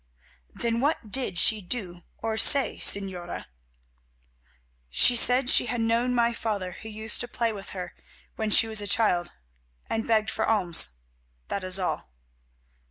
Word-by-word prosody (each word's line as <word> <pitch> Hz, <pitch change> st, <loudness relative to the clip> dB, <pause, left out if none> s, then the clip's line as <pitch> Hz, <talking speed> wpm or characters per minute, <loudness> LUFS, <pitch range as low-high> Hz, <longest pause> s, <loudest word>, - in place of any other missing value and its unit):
"Then 235 Hz, -1 st, -3 dB
what 270 Hz, -6 st, -2 dB
did 250 Hz, -8 st, -1 dB
she 215 Hz, +3 st, +3 dB
do 180 Hz, -3 st, -4 dB, 0.2 s
or 225 Hz, -1 st, -4 dB
say, 270 Hz, +5 st, +4 dB
Señora?" 185 Hz, -3 st, -2 dB, 1.4 s
"She 245 Hz, -, +4 dB
said 250 Hz, +2 st, +5 dB
she 245 Hz, -, +4 dB
had 240 Hz, +1 st, -4 dB
known 230 Hz, +2 st, -1 dB
my 235 Hz, 0 st, +1 dB
father 205 Hz, -5 st, -4 dB
who 220 Hz, +5 st, -11 dB
used 220 Hz, 0 st, -3 dB
to 245 Hz, -, -5 dB
play 235 Hz, -2 st, -3 dB
with 200 Hz, -2 st, -10 dB
her 180 Hz, -2 st, -8 dB, 0.4 s
when 220 Hz, -1 st, -3 dB
she 215 Hz, -, +5 dB
was 220 Hz, -1 st, +2 dB
a 205 Hz, -, -6 dB
child, 190 Hz, -4 st, +1 dB, 0.6 s
and 225 Hz, 0 st, -4 dB
begged 220 Hz, -1 st, 0 dB
for -, -, -3 dB
alms, 180 Hz, -, +3 dB, 0.6 s
that 200 Hz, -, -4 dB
is 185 Hz, 0 st, +3 dB
all. 185 Hz, -, -4 dB
220 Hz, 155 wpm, -25 LUFS, 190-235 Hz, 1.4 s, said